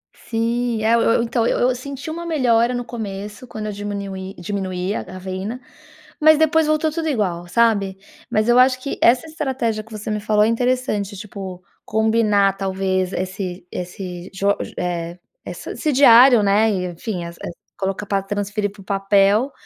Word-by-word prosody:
Sim, 230 0 -1
é, 225 +1 +3
eu 235 - +4
eu, 230 +1 +3
então 230 0 0
eu - - +1
eu 250 0 +2
senti 275 +4 -7
uma 340 +1 -5
melhora, 250 -7 +2
no 245 -1 -3
começo, 210 +1 -6
quando 215 -2 -6
eu 210 - -3
diminuí 200 -2 -5
diminuía 185 +1 -3
a - - -5
cafeína, 190 +5 -6 0.6
mas 315 0 +7
depois 315 0 +3
voltou 310 0 +1
tudo 320 0 -3
igual, 180 -9 -1
sabe? 200 -3 +2 0.3
Mas 215 +2 +1
eu 245 +1 +6
acho 255 0 +4
que 275 - -4
essa 245 +5 +4
estratégia 265 -9 -2
que 225 - -20
você 215 +1 -5
me 210 - -1
falou 210 0 +2
é - - +2
interessante 230 -4 0
tipo, 190 -3 -8 0.2
combinar 215 -3 +2
talvez 190 -1 -1
esse 185 -1 -4
esse 180 0 -6
jo 200 +1 +1
ge - - -7
eh, 175 -1 -3 0.3
essa - - -7
esse 305 - -1
diário, 245 -3 +7
né, 210 +3 +3
e, 185 -2 -1
enfim, 175 0 -5
es 170 0 -8 0.4
colocar 195 +1 -3
pra 195 -1 0
transferir 205 +1 -2
para 200 -1 -15
o - - -13
papel 200 +5 +2
210 Hz, 175 wpm, -21 LUFS, 195-240 Hz, 0.6 s, mas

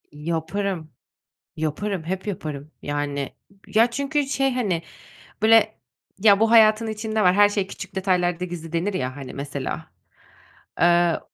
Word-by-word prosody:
Yaparım, 165 +2 -3 0.7
yaparım, 160 +4 -2
hep 190 +4 -4
yaparım, 155 -7 -5
yani. 145 -1 -3 0.3
Ya 230 +2 +3
çünkü 280 +3 -1
şey, 270 -1 +1
hani, 195 -10 -1 0.6
böyle, 220 -1 +5 0.4
"Ya, 200 0 +5
bu 225 0 +3
hayatın 220 -1 +6
içinde 220 0 -2
var, 180 -1 +5
her 205 +1 +6
şey 205 -2 -1
küçük 190 - -9
detaylarda 180 -2 0
gizli." 170 -2 -7
denir 180 +4 -1
ya. 130 -5 -3
Hani, 135 -3 -8
mesela, 140 -1 -5 0.9
eee, 175 0 +4
185 Hz, 130 wpm, -23 LUFS, 160-215 Hz, 0.9 s, hayatın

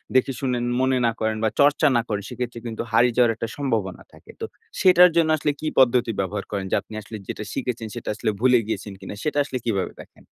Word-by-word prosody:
দেখে 130 +1 +3
শুনেন, 125 -3 -1 0.2
মনে 130 0 +2
না 115 - +3
করেন 110 0 0
বা 110 - +3
চর্চা 145 +2 +5
না - - +3
করেন 105 -2 -2
সেক্ষেত্রে 125 -1 -5
কিন্তু 110 -1 -4
হারিয়ে 120 +1 +4
যাওয়ার 120 -2 +5
একটা 115 - -4
সম্ভাবনা 115 -10 -2
থাকে। - - -15
তো - - -1 0.4
সেটার 180 -1 +7
জন্য 165 -2 +3
আসলে 150 0 0
কী 155 - -3
পদ্ধতি 125 -2 +4
ব্যবহার 100 +1 -2
করেন? 100 -2 -2
যে - - +3
আপনি - - -15
আসলে 110 +1 -8
যেটা - - -5
শিখেছেন 125 -4 -3
সেটা - - -5
আসলে 110 - -1
ভুলে 125 +1 +5
গিয়েছেন 105 -2 -4
কিনা? 95 - -8
সেটা 150 -1 -1
আসলে 130 - -4
কীভাবে 100 -5 -1
দেখেন? - - -18
120 Hz, 220 wpm, -23 LUFS, 110-130 Hz, 0.4 s, সেটার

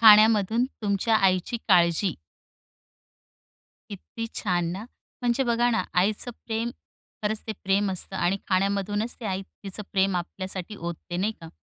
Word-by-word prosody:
खाण्यामधून 220 +1 +7 0.2
तुमच्या 205 +2 +2
आईची 190 +3 +2
काळजी. 175 -1 +4 1.8
किती 230 +3 -6
छान! 175 -4 0
ना? 195 +4 -5 0.4
म्हणजे 245 +2 +2
बघा 240 0 +3
ना, 225 - +2
आईचं 205 +6 +1 0.2
प्रेम 230 +1 -1 0.5
खरंच 215 +1 0
ते 220 - -2
प्रेम 195 +1 +2
असतं. 190 +1 -3
आणि 185 +2 +2
खाण्यामधूनच 200 +3 +1
ते - - -8
आई 190 -1 -1
तिचं 195 +1 -8
प्रेम 195 -1 +2
आपल्यासाठी 185 +2 -4
ओतते 175 +1 -6
नाही 200 +5 +1
का? 165 - -9
200 Hz, 135 wpm, -26 LUFS, 185-220 Hz, 1.8 s, खाण्यामधून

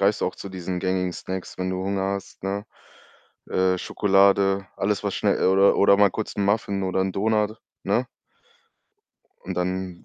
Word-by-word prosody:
greifst 100 +2 +2
du - - +2
auch 90 - -4
zu 100 - -8
diesen 90 -1 -4
gängigen 95 -1 0
Snacks, 95 +1 -6
wenn 95 0 -1
du 95 - -2
Hunger 100 0 -1
hast, 100 - -9
ne? 100 +2 -2 0.8
Äh, 95 0 +1
Schokolade, 95 0 +3
alles 100 0 -1
was - - -1
schnell - - +1
oder 95 +1 +5
oder 100 0 +5
mal 100 -1 +5
kurz 110 - -5
'n 100 - 0
Muffin 100 -1 0
oder 95 0 0
'n 95 - -2
Donut, 110 +2 0 0.3
ne? - - +1 1.3
Und 95 - -6
dann, 90 0 -3
95 Hz, 175 wpm, -24 LUFS, 95-100 Hz, 1.3 s, oder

